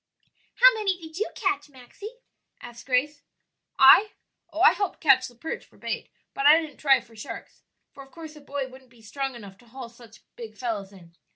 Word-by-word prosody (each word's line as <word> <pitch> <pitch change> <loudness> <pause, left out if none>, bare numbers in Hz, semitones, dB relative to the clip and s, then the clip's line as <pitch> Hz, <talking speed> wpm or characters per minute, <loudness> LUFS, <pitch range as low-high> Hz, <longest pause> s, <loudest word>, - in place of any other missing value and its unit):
"How - - +7
many 400 -5 -1
did 320 +1 -10
you 430 - -1
catch, 380 -6 -2
Maxie?" 285 - -12 0.4
asked 235 0 -12
Grace. 285 +3 0 0.6
"I? 330 +11 +7 0.4
Oh, 320 +2 -4
I 415 - +8
helped 400 -3 -3
catch 270 -4 +4
the 245 - -16
perch 320 +7 -6
for - - -24
bait; - - -5 0.2
but 275 - +1
I 310 +2 +8
didn't 315 -3 -8
try 275 -2 +3
for 225 - -20
sharks, 215 - -10 0.3
for 275 - -13
of 270 - -14
course 320 -2 -11
a 300 - -14
boy 280 -1 -5
wouldn't 260 0 -16
be 235 -2 -22
strong 270 +4 -4
enough 200 -4 -12
to 240 - -22
haul 250 0 -9
such 235 -2 -18
big 220 -3 -10
fellows 210 -5 -4
in. 170 -4 -17
270 Hz, 200 wpm, -25 LUFS, 235-320 Hz, 0.6 s, I